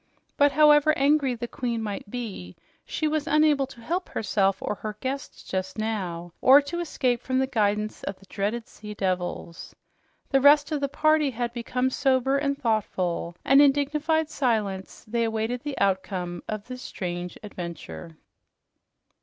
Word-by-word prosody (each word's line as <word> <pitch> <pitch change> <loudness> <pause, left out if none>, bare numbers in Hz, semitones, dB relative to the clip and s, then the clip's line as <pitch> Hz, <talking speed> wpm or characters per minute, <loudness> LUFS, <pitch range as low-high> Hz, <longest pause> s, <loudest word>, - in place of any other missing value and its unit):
But 285 0 +4
however 300 +1 +5
angry 275 -2 +3
the 240 +1 -5
queen 235 -2 -3
might 205 -1 -5
be, 205 - -6 0.3
she 310 - -1
was 310 0 -1
unable 300 -3 +3
to 245 -3 -14
help 350 +9 -2
herself 195 -2 +1
or - - -2
her 210 0 -6
guests 275 +2 -5
just 190 +1 -4
now 180 -6 -3
or 265 +2 +8
to 290 +4 -4
escape 255 -8 0
from 260 0 -1
the 265 - +3
guidance 215 -4 0
of 195 - -4
the 195 - -18
dreaded 210 +5 -3
sea 210 0 -10
devils. 180 -3 -3 0.6
The 270 -1 +4
rest 290 +2 +6
of 300 -2 -1
the 280 - 0
party 310 0 +3
had 240 -1 -3
become 250 +2 -1
sober 265 +1 +2
and 280 -1 -1
thoughtful, 185 -8 -1
and 275 +1 +7
in 285 -1 +7
dignified 300 +3 0
silence 215 -10 -1
they 235 +2 0
awaited 225 +2 -1
the 290 -1 -5
outcome 185 -2 -1
of 215 -1 -4
this 255 0 -7
strange 175 -4 -5
adventure. 170 -4 -8
240 Hz, 160 wpm, -26 LUFS, 200-280 Hz, 0.6 s, or